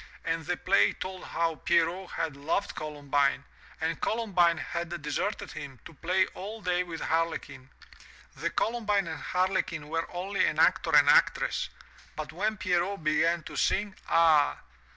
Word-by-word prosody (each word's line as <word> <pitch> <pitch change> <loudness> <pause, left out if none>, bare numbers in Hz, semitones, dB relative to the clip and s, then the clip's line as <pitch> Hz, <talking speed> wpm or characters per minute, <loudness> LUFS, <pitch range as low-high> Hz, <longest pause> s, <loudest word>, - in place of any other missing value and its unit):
And 165 -1 -2
the 180 0 0
play 195 +2 +3
told 185 0 -7
how 165 -1 -1
Pierrot 175 +3 +1
had 160 -4 -2
loved 145 +7 -2
Columbine, 145 -2 0 0.4
and 160 +1 -2
Columbine 185 -7 +2
had 170 +3 -4
deserted 190 +7 -3
him, 135 -3 -8
to - - -11
play 180 +5 +1
all 210 +4 -7
day 180 -3 0
with 170 -3 -6
Harlequin. 160 -5 -2 0.7
The - - -2
Columbine 210 -4 0
and 160 -2 -5
Harlequin 180 -5 -1
were 165 +1 -2
only 190 +3 -1
an - - -1
actor - - +3
and - - +7
actress, - - +3 0.5
but 150 -1 -5
when 210 +5 -1
Pierrot 180 0 0
began 165 +2 +2
to - - -9
sing 200 0 0
— - - -15
ah! 160 -3 +4
170 Hz, 150 wpm, -29 LUFS, 160-190 Hz, 0.7 s, and